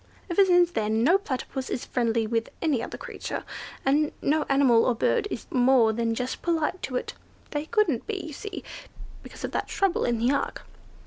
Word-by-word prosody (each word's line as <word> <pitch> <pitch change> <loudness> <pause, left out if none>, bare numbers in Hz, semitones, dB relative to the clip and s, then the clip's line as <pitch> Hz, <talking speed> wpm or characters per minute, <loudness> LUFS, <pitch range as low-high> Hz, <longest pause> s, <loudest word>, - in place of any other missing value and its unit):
Ever 390 +3 +5
since 355 -2 +4
then 220 -3 0
no 345 +9 +5
Platypus 265 -5 -4
is - - -3
friendly 230 -2 0
with 230 +1 -1
any 295 -8 +1
other - - -6
creature, - - -6 0.4
and 295 +3 +3
no 305 +2 +1
animal 270 -4 +5
or 250 - +2
bird 410 - +1
is 240 - -5
more 250 -3 +4
than 230 0 0
just 250 +2 -3
polite 335 +1 0
to 255 - -4
it. - - -2 0.4
They 295 0 -3
couldn't 395 - +1
be, 430 -2 -2
you 315 - -7
see, 405 +6 -7 0.6
because - - -11
of - - -3
that - - -2
trouble 390 -2 +1
in 240 -1 +1
the 240 +4 +2
ark." - - -2
270 Hz, 190 wpm, -26 LUFS, 235-340 Hz, 0.6 s, Ever